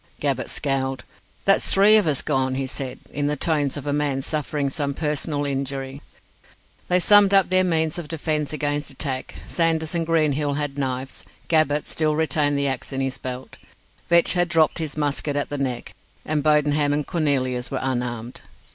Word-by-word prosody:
Gabbett - - -1
scowled. 135 -2 -2 0.4
"That's 195 - +3
three 205 +2 +6
of 210 -5 +4
us 145 -4 0
gone," 130 -3 0
he 135 0 -2
said, 130 0 -5
in 145 0 -2
the 150 - 0
tones 145 -2 0
of 145 - -6
a 145 - -1
man 145 -2 -1
suffering 145 -2 -2
some 140 -1 -2
personal 150 -1 -2
injury. 135 0 -4 0.9
They 180 0 +3
summed 200 +1 +6
up 195 -2 +4
their 185 0 +5
means 160 -2 +1
of 165 - -7
defence 155 -2 -1
against 145 -1 -1
attack. 135 -1 -3
Sanders 165 -1 0
and 170 -1 0
Greenhill 150 -3 +1
had 145 -1 -3
knives. 130 -1 -3 0.3
Gabbett 150 -2 +2
still 155 -1 0
retained 150 -1 +1
the 140 0 +1
axe 135 +1 -3
in 135 - -3
his 135 0 -2
belt. 130 0 -7 0.5
Vetch 170 0 +5
had 175 -1 +1
dropped 160 0 +2
his 155 -2 -3
musket 145 0 -1
at 145 - -1
the 145 - -4
Neck, 130 -3 -3 0.3
and 155 -1 0
Bodenham 150 -1 +3
and 145 0 -1
Cornelius 130 -7 -1
were 135 - -3
unarmed. 125 -2 -3
145 Hz, 175 wpm, -23 LUFS, 135-160 Hz, 0.9 s, three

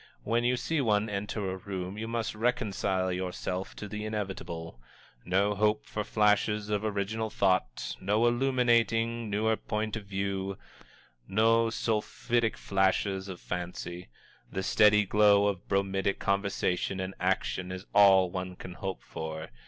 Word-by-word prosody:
When 115 +2 +1
you 125 +1 +2
see 155 +5 0
one 105 -3 +1
enter 100 -1 -2
a 95 - -4
room, 95 0 -5
you 110 +1 -4
must 115 -1 -2
reconcile 100 -5 0
yourself 90 0 -3
to 105 - -6
the 105 0 -5
inevitable. 95 - -5 0.5
No 100 +3 +2
hope 105 +1 +1
for 105 - -3
flashes 105 0 +2
of 105 0 0
original 110 +1 -1
thought, 95 - 0
no 105 +4 +2
illuminating, 120 -2 +2
newer 110 +2 +1
point 110 0 -3
of 110 -2 -6
view, 95 0 -2 0.7
no 115 +3 +3
sulphitic 115 +1 0
flashes 95 0 +1
of 95 -2 -7
fancy 90 -1 -5 0.4
the 95 - -3
steady 105 +1 +5
glow 100 0 +5
of 100 -4 -2
bromidic 95 0 0
conversation 100 -2 0
and 95 +1 -3
action 95 0 -1
is 95 +1 -6
all 95 -3 +6
one 90 0 -4
can 90 0 -9
hope 95 +1 -5
for. 80 -1 -6
100 Hz, 140 wpm, -29 LUFS, 95-110 Hz, 0.7 s, all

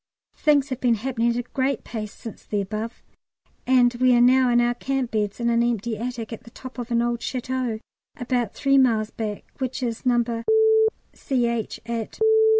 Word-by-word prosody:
Things 290 -2 +2
have 255 -1 -4
been 240 -2 +3
happening 235 +1 -1
at 235 - 0
a 245 - -1
great 265 +2 -1
pace 215 -3 -5
since 225 - -10
the 205 - -2
above, 215 +4 -5 0.6
and 250 -1 +4
we 250 +1 +3
are - - +4
now 255 +1 +5
in 240 0 +4
our 240 0 +2
camp 265 0 -2
beds 210 -1 -1
in 235 - 0
an 235 0 +3
empty 235 -1 0
attic 235 0 -5
at 225 - -8
the - - -13
top 255 +2 -10
of 240 0 -5
an 235 0 +2
old 240 0 -1
château 255 -2 -3 0.4
about 245 -3 -1
three 275 -1 +3
miles 225 -4 +2
back, 210 -2 -4 0.2
which 260 0 -3
is 230 -2 -3
No. 235 -2 +1 0.7
C.H., 235 -5 -1
at 230 -2 -4
240 Hz, 185 wpm, -24 LUFS, 230-255 Hz, 0.7 s, now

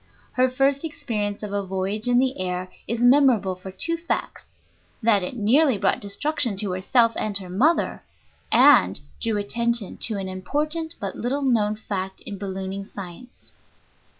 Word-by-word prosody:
Her 255 +1 +2
first 270 +2 +1
experience 210 -10 -3
of 205 -1 -5
a 200 0 -1
voyage 195 +4 -2
in 245 0 +3
the 260 -2 +1
air 180 0 -3 0.2
is 230 +1 -2
memorable 245 -6 +4
for 185 +1 -10
two 330 - 0
facts, 335 +1 -4 0.5
that 215 -3 +4
it 180 +7 -4
nearly 250 +4 +3
brought 195 -1 +1
destruction 230 +2 0
to 200 -1 +1
herself 230 +6 +3
and 205 -2 -1
her 185 -2 -8
mother, 280 - +1 0.5
and - - +6 0.2
drew 225 -3 0
attention 235 +1 -1
to 220 -3 0
an 195 -1 -4
important 300 - -2
but 200 -3 -4
little 275 +4 -2
known 215 -5 +2
fact 190 -3 -5
in 200 -2 -8
ballooning 195 0 -5
science. 200 +5 -10
210 Hz, 155 wpm, -24 LUFS, 195-255 Hz, 0.5 s, and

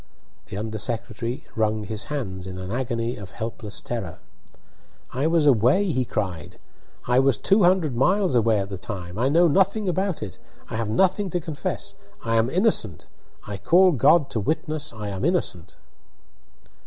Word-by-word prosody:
The 95 - -6
under 110 +1 -4
secretary 115 +3 -3
wrung 110 -1 0
his 105 -1 -3
hands 95 -11 -4
in 95 -1 -6
an 95 +1 -6
agony 120 -1 -2
of 100 -3 -9
helpless 110 0 -6
terror. 110 -9 -5 1.0
"I 135 +5 +1
was 165 -2 +3
away!" 140 - +4
he 130 -4 0
cried. 90 -8 -4 0.5
"I 125 +1 +3
was 135 -1 +3
two 200 +2 +3
hundred 175 -7 +3
miles 185 - +2
away 115 -2 +3
at 100 -1 -2
the 95 -2 -6
time! 95 -3 -6
I 130 +3 +2
know 170 +4 +5
nothing 195 +5 +2
about 185 0 -1
it 95 - -8 0.3
I - - -3
have 110 -1 -2
nothing 190 - +2
to 175 - -1
confess 160 -3 -4 0.3
I 115 0 +1
am 115 +2 +2
innocent 170 - +1 0.4
I 100 -1 -5
call 180 - +5
God 145 +2 +4
to 115 - -1
witness 155 +5 -2
I 105 -2 -6
am 95 +1 -4
innocent!" 115 - -1
120 Hz, 165 wpm, -24 LUFS, 105-165 Hz, 1.0 s, know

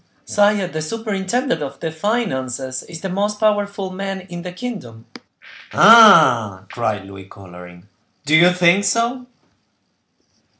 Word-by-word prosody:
"Sire, 205 -2 +1
the 155 -2 -6
superintendent 210 - -3
of 140 -1 -7
the 160 - -5
finances 130 - -3
is 165 -1 -11
the - - -4
most 205 +3 -3
powerful 200 -3 -1
man 195 0 -6
in 175 -2 -10
the 180 0 -8
kingdom." 180 - -9 0.7
"Ah!" 155 - +6
cried 110 -5 -3
Louis, 95 -1 -12
coloring, 90 -1 -15 0.4
"do 150 +2 +2
you 170 +2 +6
think 180 +2 +2
so?" 240 +4 -1
180 Hz, 125 wpm, -18 LUFS, 130-205 Hz, 0.7 s, Ah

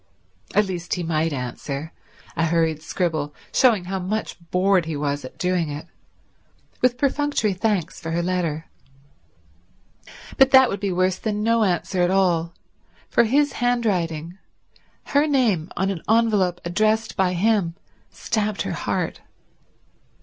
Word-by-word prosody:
At 210 - +4
least, 180 -2 -3
he 180 - -3
might 160 0 0
answer—a 140 +5 -5
hurried 160 -2 +1
scribble, 155 -4 -2 0.2
showing 220 -8 +4
how 190 +1 -3
much 205 +4 -3
bored 185 0 +2
he 160 -2 -3
was 145 0 -2
at 130 - -10
doing 180 -3 0
it, 145 +2 -6 1.0
with 245 -1 +3
perfunctory 280 -6 +1
thanks 185 -3 -1
for 165 - -5
her 170 +1 -1
letter. 170 -3 -1 1.7
But 270 0 +6
that 265 -2 +7
would 200 - -3
be 200 -1 -1
worse 185 +1 +1
than 210 -1 -2
no 230 0 +3
answer 180 0 0
at 175 - +3
all; 175 -3 +1 0.5
for 235 - +4
his 285 +5 +2
handwriting, 185 -8 -1 0.6
her 290 +2 +2
name 225 - +1
on 190 +2 +1
an 175 -4 -5
envelope 210 -6 +2
addressed 215 +5 +1
by 190 -2 +1
him, 190 -2 +1 0.3
stabbed 215 -3 -2
her - - -3
heart. - - -2
185 Hz, 135 wpm, -23 LUFS, 165-220 Hz, 1.7 s, that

